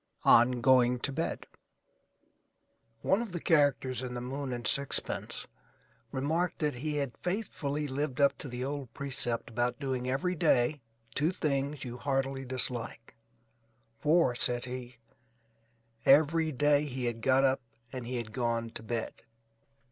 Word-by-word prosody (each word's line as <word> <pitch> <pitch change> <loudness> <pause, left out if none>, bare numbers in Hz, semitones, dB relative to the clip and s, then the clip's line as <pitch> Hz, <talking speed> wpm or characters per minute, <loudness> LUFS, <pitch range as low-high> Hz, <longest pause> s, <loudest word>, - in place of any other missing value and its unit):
ON 120 +1 +6
GOING 125 -1 +5
TO 140 - -2
BED 160 +4 -3 1.6
One 195 +4 +3
of 225 -6 -6
the 175 - -2
characters 145 -6 +2
in 125 -1 -5
"The - - -3
Moon 135 +2 -4
and 120 -1 -4
Sixpence" 140 -1 0 0.7
remarked 160 +7 0
that 150 -3 0
he 150 +5 -3
had 140 -5 -2
faithfully 150 -7 -3
lived 140 0 -3
up 140 -1 +4
to - - -5
the 125 0 -4
old 140 -3 -4
precept 130 -4 -2
about 120 +1 0
doing 130 -2 -2
every 140 +8 0
day 140 -3 +2 0.3
two 150 +7 +1
things 140 -4 -1
you 120 0 -6
heartily 135 0 -1
dislike; 125 -3 -1 0.8
for, 155 -4 +3
said 120 0 0
he, 125 -1 -7 1.1
every 155 +3 +5
day 145 +2 +3
he 130 -3 -4
had 115 -1 -2
got 135 +2 +4
up 135 0 +2 0.3
and 125 -2 -5
he 125 - -3
had 115 -2 -5
gone 115 -2 -1
to - - -7
bed. 115 0 -3
135 Hz, 145 wpm, -30 LUFS, 125-145 Hz, 1.6 s, ON